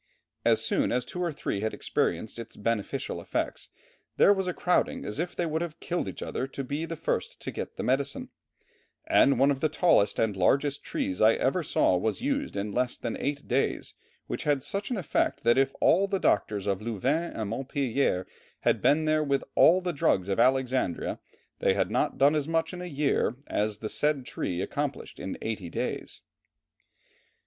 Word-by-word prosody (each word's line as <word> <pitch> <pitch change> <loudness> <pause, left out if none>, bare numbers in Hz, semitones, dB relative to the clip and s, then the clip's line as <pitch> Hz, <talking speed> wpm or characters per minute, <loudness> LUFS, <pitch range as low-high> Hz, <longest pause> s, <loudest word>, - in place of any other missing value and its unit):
As - - +3
soon - - +1
as 125 0 0
two 180 - -5
or 175 -2 0
three 120 -8 -3
had 110 0 -2
experienced 105 +7 -1
its 115 - -8
beneficial 105 -1 -2
effects - - -3 0.5
"there 200 - +7
was 190 -2 -2
a - - +1
crowding 180 - +1
as 105 - -4
if 175 +1 -2
they 175 - 0
would 160 0 -1
have 170 -1 -5
killed 175 0 -2
each - - -6
other 130 - -3
to 135 0 -5
be 145 +5 -3
the 165 - -5
first - - -2
to - - -4
get - - -6
the - - -3
medicine; 135 +2 0 0.8
and 140 - +4
one 140 +2 +5
of 135 - -1
the 155 - +1
tallest 155 - +3
and 110 -3 +1
largest 140 +9 +2
trees 95 - -3
I 110 +1 +6
ever 155 +8 +1
saw 95 - +2
was 110 +4 -1
used 280 - -2
in 100 +1 -2
less 125 +2 0
than 120 - -3
eight 145 +1 -3
days, 130 +3 0 0.3
which - - -4
had 145 -3 +1
such 200 0 -2
an 245 - -1
effect 180 - 0
that 120 +2 +4
if 135 0 +1
all 195 +4 +4
the 195 0 0
doctors 105 - +1
of 100 -1 -1
Louvain 130 - -1
and 110 -2 -4
Montpellier 130 -6 0 0.4
had - - +2
been 155 +2 +3
there 155 0 +2
with 140 -2 0
all 180 +3 +6
the 175 -1 -2
drugs 95 -8 +1
of 95 - 0
Alexandria, 130 -6 +1 0.4
they - - +2
had - - 0
not - - 0
done 140 +2 +5
as 150 -2 0
much 165 +1 0
in 180 - -6
a - - -5
year 145 -7 0
as 105 0 -1
the 110 - -5
said 150 +1 0
tree 90 -6 -3
accomplished 145 +5 -4
in 95 - -5
eight 105 -6 -4
days." - - -4
135 Hz, 195 wpm, -28 LUFS, 110-160 Hz, 0.8 s, there